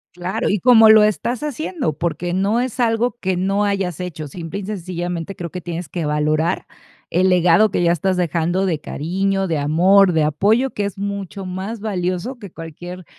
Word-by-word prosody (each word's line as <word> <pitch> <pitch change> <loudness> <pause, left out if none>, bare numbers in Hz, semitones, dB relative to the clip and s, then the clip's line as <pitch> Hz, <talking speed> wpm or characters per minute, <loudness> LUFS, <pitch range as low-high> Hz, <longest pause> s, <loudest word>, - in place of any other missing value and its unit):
Claro, 185 +6 -2
y 205 - +2
como 225 -1 +7
lo 220 -1 +8
estás 225 +5 0
haciendo, 300 - -2
porque 170 +3 -3
no 200 +5 +1
es 255 -1 -4
algo 235 +1 +1
que 185 -1 0
no 195 +3 +1
hayas 195 -5 -1
hecho. 160 -4 -5
Simple 165 +5 -6
y - - -7
sencillamente, 180 -2 -4
creo 170 -2 -6
que 180 - -6
tienes 170 -1 -5
que 170 +1 -4
valorar 155 +3 0 0.5
el 185 +2 +3
legado 180 +3 +4
que 185 - 0
ya 170 - +4
estás 185 +2 0
dejando 175 +2 0
de 165 -5 -1
cariño, 195 +6 -1
de 160 -3 -1
amor, 180 +6 +4
de 160 -1 +2
apoyo, 210 - +2
que 205 - -2
es 200 0 -5
mucho 200 -1 -5
más 190 +5 -5
valioso 200 +4 -3
que 200 -5 -10
cualquier 175 +3 -9
185 Hz, 185 wpm, -20 LUFS, 170-205 Hz, 0.5 s, lo